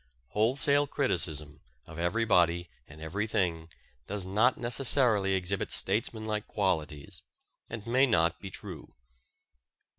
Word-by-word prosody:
Wholesale 140 - +2
criticism 80 - -1 0.2
of 80 0 -11
everybody 85 -3 +1 0.2
and 75 +1 -14
everything 85 -1 -2 0.4
does 100 -2 -2
not 110 +7 +2
necessarily 120 -5 +2
exhibit 95 +1 -1
statesmanlike 110 -2 +1
qualities, 80 -8 -3 0.5
and 110 -2 -7
may 130 +4 +3
not 85 -7 +1
be 95 - -8
true. - - -10
100 Hz, 100 wpm, -29 LUFS, 85-115 Hz, 0.5 s, may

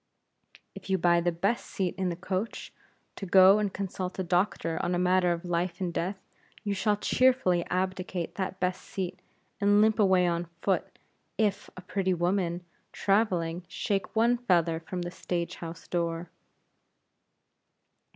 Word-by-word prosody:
If - - -11
you 190 - +3
buy 170 -1 +3
the 175 +1 +1
best 195 +8 0
seat 185 -3 -2
in 190 -1 -1
the 170 - -3
coach, 185 +5 -4 0.4
to 195 - -5
go 190 +3 +7
and 205 -2 0
consult 185 -1 -4
a 190 - -1
doctor 175 -2 0
on 175 - 0
a - - +1
matter 180 0 +3
of 170 +1 -3
life 175 0 -1
and 180 -3 -2
death, 185 +5 -2 0.5
you 205 - -1
shall 205 +1 +1
cheerfully 250 -8 +3
abdicate 185 -1 -2
that 190 -1 -4
best 180 0 -1
seat, 185 -2 -5 0.4
and 205 0 +4
limp 220 +1 +3
away 190 -3 +4
on 170 0 0 0.2
foot, 195 -2 0 0.4
if 205 -2 0
a - - -7
pretty 190 0 -1
woman, 175 0 0 0.3
traveling, 180 -5 +1
shake 195 +2 -2
one 235 +2 +3
feather 170 -8 +2
from 175 +2 -5
the 175 - -5
stage 175 -1 -3
house 165 0 -8
door. 170 -1 -2
185 Hz, 155 wpm, -28 LUFS, 175-195 Hz, 0.5 s, go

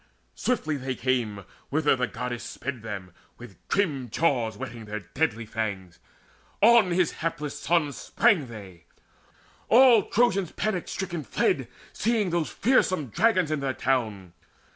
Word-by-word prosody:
Swiftly 155 -12 -1
they 130 -1 -4
came 115 -6 -1 0.2
Whither 150 0 +2
the 125 -1 -1
Goddess 120 0 -5
sped 130 -2 -6
them: 100 -4 -7 0.3
with - - -13
grim 145 -11 0
jaws 120 -5 +1
Whetting 115 0 -7
their 105 0 -5
deadly 115 0 -2
fangs, 100 -5 -4 0.6
on 230 -2 +6
his 175 -1 +2
hapless 155 -3 -3
sons 150 -4 +1
Sprang 160 -11 +2
they. 95 -8 -11 0.8
All 240 -4 +7
Trojans 195 -6 +2
panic 190 -4 -2
stricken 175 -5 -4
fled, - - 0 0.3
Seeing 215 -4 0
those 170 -2 0
fearsome 185 - +1
dragons 185 - +2
in 155 - 0
their 135 -1 -2
town. 110 -9 -1
140 Hz, 135 wpm, -26 LUFS, 115-180 Hz, 0.8 s, All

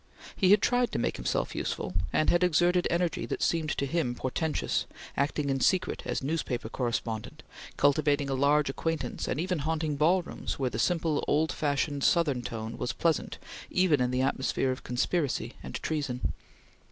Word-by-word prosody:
He 185 - +3
had 205 +1 +6
tried 245 -1 +2
to - - 0
make - - -1
himself - - -1
useful, - - -3 0.2
and 155 - +3
had 175 +1 +3
exerted 175 +1 +3
energy 170 -1 0
that - - -2
seemed 160 -2 +1
to 140 - 0
him 140 -4 -1
portentous, 150 +5 -1 0.3
acting 145 +1 0
in 135 - 0
secret 185 +6 +1
as - - -2
newspaper 130 -6 -2
correspondent, 115 -3 -3 0.3
cultivating 145 0 +3
a 135 - -1
large 145 +2 +3
acquaintance 140 -1 -2
and 140 - -1
even 180 0 -1
haunting 155 0 -1
ballrooms 175 +4 +1
where 130 -2 -1
the 110 - -3
simple, 165 0 +1
old 155 +2 +2
fashioned, 145 -1 -1
Southern 150 -8 +3
tone 115 -1 -5
was - - -2
pleasant 165 -3 0 0.3
even 180 -7 +3
in 125 - +2
the 125 +1 +1
atmosphere 130 0 0
of 130 - -5
conspiracy 125 -2 -1
and - - -7
treason. 145 -5 -2
145 Hz, 165 wpm, -29 LUFS, 130-165 Hz, 0.3 s, had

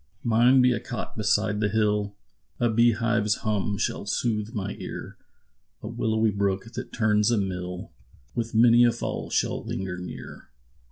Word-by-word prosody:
Mine 120 +3 +5
be 125 0 +4
a - - -2
cot 120 - -6
beside 105 -1 +1
the 105 -1 +1
hill, 105 -1 0 0.4
A 120 -1 +2
bee 115 +1 +4
hive's 115 -2 +1
hum 105 -2 0
shall 105 - -2
sooth 105 +1 -1
my 100 -4 -3
ear; - - -7 0.7
A - - -5
willowy 110 -1 0
brook, 100 +2 -2
that 125 +1 -6
turns 105 -2 +2
a 120 - +2
mill, 90 -2 -4 0.4
With 115 -1 -3
many 120 +1 +6
a 120 - +5
fall 115 - -4
shall - - 0
linger 95 -2 -4
near. 90 - -9
110 Hz, 160 wpm, -26 LUFS, 100-115 Hz, 0.7 s, many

